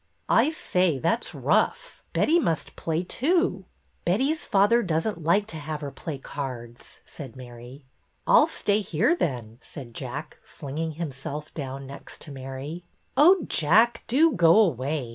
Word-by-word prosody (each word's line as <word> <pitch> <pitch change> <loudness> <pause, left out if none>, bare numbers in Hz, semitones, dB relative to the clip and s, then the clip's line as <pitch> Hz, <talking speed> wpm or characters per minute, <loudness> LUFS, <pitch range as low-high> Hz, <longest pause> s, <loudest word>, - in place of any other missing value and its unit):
" - - -39
I - - +1
say, 180 - 0
that 170 - 0
's - - -9
rough. - - 0
Betty 335 +3 +3
must 165 - -2
play, 165 +1 -2
too." 335 - 0 0.2
" - - -42
Betty's 265 - +1
father 205 +3 +4
does 165 -6 -1
n't 200 -7 -3
like 195 +6 +3
to - - -5
have 155 0 -5
her 140 -1 -5
play 155 0 -6
cards," 125 -4 -7
said 135 -7 -10
Mary. 125 +2 -11 0.2
" - - -44
I - - +7
'll - - +4
stay 205 0 0
here, 205 - +1
then," 120 - -3
said 130 -6 -10
Jack, - - -7
flinging 155 +3 -5
him 160 -1 -4
self 140 +3 -7
down 135 -2 -6
next 140 +1 -10
to 150 - -9
Mary. 135 +5 -7 0.2
" - - -43
Oh, 340 +6 +6
Jack, 220 +10 +3
do 310 +7 +4
go 170 +3 +5
away. 140 - +1
160 Hz, 175 wpm, -26 LUFS, 135-210 Hz, 0.2 s, I